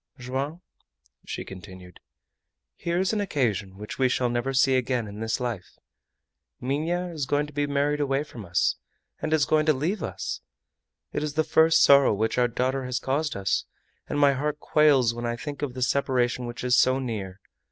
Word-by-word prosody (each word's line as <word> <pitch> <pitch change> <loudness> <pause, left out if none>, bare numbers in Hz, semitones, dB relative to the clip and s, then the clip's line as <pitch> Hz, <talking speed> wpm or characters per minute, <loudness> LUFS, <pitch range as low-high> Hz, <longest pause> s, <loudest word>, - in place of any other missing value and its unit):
"Joam," 135 +7 -4 0.6
she - - -5
continued, 90 -1 -11 0.8
"here 170 0 -2
is 190 +3 +1
an 210 - 0
occasion 110 - -1
which 105 +5 -8
we 130 -1 +4
shall 125 -1 +1
never 120 +3 -1
see 135 0 +3
again 125 -3 0
in 105 +1 -8
this 110 +2 -1
life. 120 -7 -5 0.8
Minha 165 +7 -1
is 150 -5 -3
going 145 +2 +1
to 150 - -13
be 145 +1 0
married 145 +1 +1
away 140 0 +1
from 120 -7 -10
us, 90 -1 +1 0.4
and 155 - -2
is 155 -3 +3
going 155 +1 +2
to 155 - +6
leave 165 +9 -2
us! - - -4 0.7
It - - -1
is 150 -1 -3
the 155 - +3
first 160 +1 +4
sorrow 140 -5 +6
which 110 +4 0
our 120 - +4
daughter 130 +2 -1
has 125 0 -2
caused 145 +4 -1
us, 100 -1 0 0.4
and - - -2
my 140 -1 +5
heart 150 +2 -2
quails 140 -8 +4
when 120 0 -4
I 120 - -1
think 145 +3 -7
of 135 -4 -3
the 130 - -1
separation 125 -2 +1
which 120 +1 -7
is 125 0 +3
so 130 0 +4
near! 105 -7 -4
130 Hz, 190 wpm, -26 LUFS, 120-150 Hz, 0.8 s, to